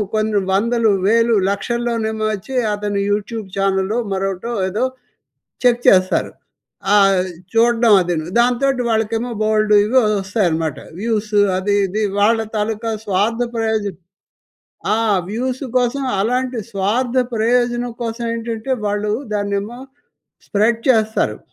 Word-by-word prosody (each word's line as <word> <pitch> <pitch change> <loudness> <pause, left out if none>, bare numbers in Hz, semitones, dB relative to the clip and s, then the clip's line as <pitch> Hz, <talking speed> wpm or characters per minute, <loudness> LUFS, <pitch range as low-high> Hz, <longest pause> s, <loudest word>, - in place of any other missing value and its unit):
కొన్ని 215 -1 +1
వందలు, 230 +3 +2 0.2
వేలు, 230 +1 +3
లక్షల్లోనేమో 220 +1 -2
వచ్చి 215 +7 -6 0.2
అతను 205 -1 -2
యూట్యూబ్ 210 +1 -3
ఛానెల్లో 195 +2 0
మరొకటో 195 +4 -2 0.2
ఏదో 215 +7 -1 0.8
చెక్ 245 -1 +3
చేస్తారు. 185 -1 +4 0.6
ఆహ్, 195 -2 +4 0.3
చూడ్డం 230 -1 +4
అదిను. 170 -3 -2
దాంతోటి 250 +2 +2
వాళ్ళకేమో 225 +2 -1
బోలెడు 215 0 +3
ఇవి 240 +5 +1 0.2
వస్తాయన్నమాట. 175 - -1 0.2
వ్యూసు 215 -1 0 0.2
అది 200 +2 0
ఇది. 215 +4 -2 0.2
వాళ్ళ 225 +2 +3 0.2
తాలూకా 220 +2 -2
స్వార్థ 210 +4 0
ప్రయోజనం. 220 -4 -1 1.0
ఆ! - - +1 0.3
వ్యూస్ 255 +5 -3
కోసం 250 +3 -1 0.2
అలాంటి 250 +3 -1
స్వార్థ 230 +6 0 0.2
ప్రయోజనం 240 +1 +1
కోసం 230 +1 -4
ఏంటంటే 230 +2 -4
వాళ్ళు 210 +1 -1 0.2
దాన్నేమో 205 +3 -2 0.7
స్ప్రెడ్ 220 +3 +1
చేస్తారు. 220 -2 +2
220 Hz, 110 wpm, -19 LUFS, 205-235 Hz, 1.0 s, చేస్తారు